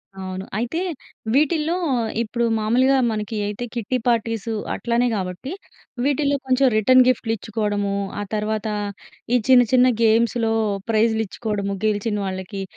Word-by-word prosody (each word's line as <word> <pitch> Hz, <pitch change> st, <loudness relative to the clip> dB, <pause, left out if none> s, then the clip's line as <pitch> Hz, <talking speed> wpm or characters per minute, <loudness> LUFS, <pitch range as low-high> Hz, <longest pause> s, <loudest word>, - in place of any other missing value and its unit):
అవును. 190 Hz, 0 st, -6 dB
అయితే 245 Hz, +10 st, -2 dB, 0.5 s
వీటిల్లో 310 Hz, +3 st, +2 dB, 0.5 s
ఇప్పుడు 235 Hz, +1 st, -1 dB
మామూలుగా 255 Hz, +5 st, +3 dB
మనకి 215 Hz, 0 st, -3 dB
అయితే 210 Hz, +4 st, -4 dB
కిట్టి 235 Hz, +2 st, -1 dB
పార్టీస్ 230 Hz, -2 st, 0 dB, 0.3 s
అట్లనే 240 Hz, +1 st, +1 dB
గాబట్టి 185 Hz, -, -4 dB, 0.5 s
వీటిల్లో 285 Hz, 0 st, +1 dB
కొంచెం 260 Hz, +1 st, +3 dB
రిటర్న్ 255 Hz, +4 st, +6 dB
గిఫ్ట్‌లు 230 Hz, -2 st, +1 dB
ఇచ్చుకోవడము. 205 Hz, -2 st, -2 dB, 0.3 s
ఆ -, -, -2 dB
తర్వాత 215 Hz, +1 st, -2 dB, 0.7 s
ఈ -, -, +6 dB
చిన్న 250 Hz, -1 st, +8 dB
చిన్న 255 Hz, 0 st, +6 dB, 0.2 s
గేమ్స్‌లో 225 Hz, 0 st, +2 dB, 0.4 s
ప్రైజ్‌లు 220 Hz, 0 st, +2 dB
ఇచ్చుకోవడము 200 Hz, -2 st, -3 dB
గెలిచినొళ్ళకి. 200 Hz, -2 st, -2 dB
225 Hz, 120 wpm, -22 LUFS, 205-250 Hz, 0.7 s, చిన్న